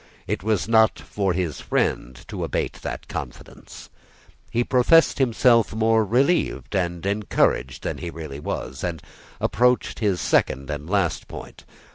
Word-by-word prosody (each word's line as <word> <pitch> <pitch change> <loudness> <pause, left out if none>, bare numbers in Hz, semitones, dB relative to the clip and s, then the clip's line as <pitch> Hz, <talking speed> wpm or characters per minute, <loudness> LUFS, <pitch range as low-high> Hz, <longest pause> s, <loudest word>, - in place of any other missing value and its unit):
It - - -2
was 105 -1 0
not 110 -1 +4
for 100 -2 -2
his 85 -4 -2
friend 65 +1 -1
to - - -5
abate - - -2
that - - -6
confidence. - - -9 0.6
He 120 +1 +1
professed 140 +7 +4
himself 120 -3 +3
more 110 0 +3
relieved 130 - +1
and 85 -2 -1
encouraged 100 -10 0
than - - -3
he 85 - -5
really 80 -4 -7
was, 65 -2 -5
and 85 -4 -3 0.4
approached 125 +1 +1
his 100 -5 +1
second 70 +2 +1
and 75 +2 -6
last 95 -5 0
point. - - -10
100 Hz, 140 wpm, -23 LUFS, 85-115 Hz, 0.6 s, not